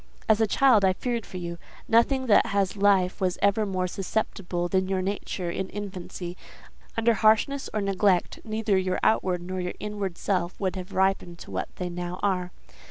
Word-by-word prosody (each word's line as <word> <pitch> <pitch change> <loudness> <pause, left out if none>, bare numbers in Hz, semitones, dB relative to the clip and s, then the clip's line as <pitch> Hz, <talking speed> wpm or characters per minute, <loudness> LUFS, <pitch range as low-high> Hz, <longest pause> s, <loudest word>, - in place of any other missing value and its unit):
"As 220 -1 +4
a 220 - +4
child 240 -2 +4
I 190 -1 +4
feared 235 +3 -3
for 185 - -7
you; 170 -1 -5 0.3
nothing 260 +4 +3
that 225 -1 +5
has 200 -2 0
life 195 -2 +3
was 185 -1 +1
ever 200 +1 +2
more 185 -2 -1
susceptible 180 -2 -2
than 185 +1 +1
your 190 -1 0
nature 190 -2 -3
in 190 +2 -3
infancy: 185 -3 -6 0.6
under 230 +1 +4
harshness 220 +6 +2
or 215 - -1
neglect, 195 -2 +1
neither 215 -3 0
your 185 -1 -1
outward 185 -5 +2
nor 185 +1 -4
your 180 0 -4
inward 205 -4 -4
self 180 -3 -1
would 190 -2 -1
have 185 +1 -7
ripened 190 -2 +1
to - - -10
what - - -2
they 180 - -3
now 175 +1 -5
are. 180 -3 0
190 Hz, 180 wpm, -26 LUFS, 180-210 Hz, 0.6 s, that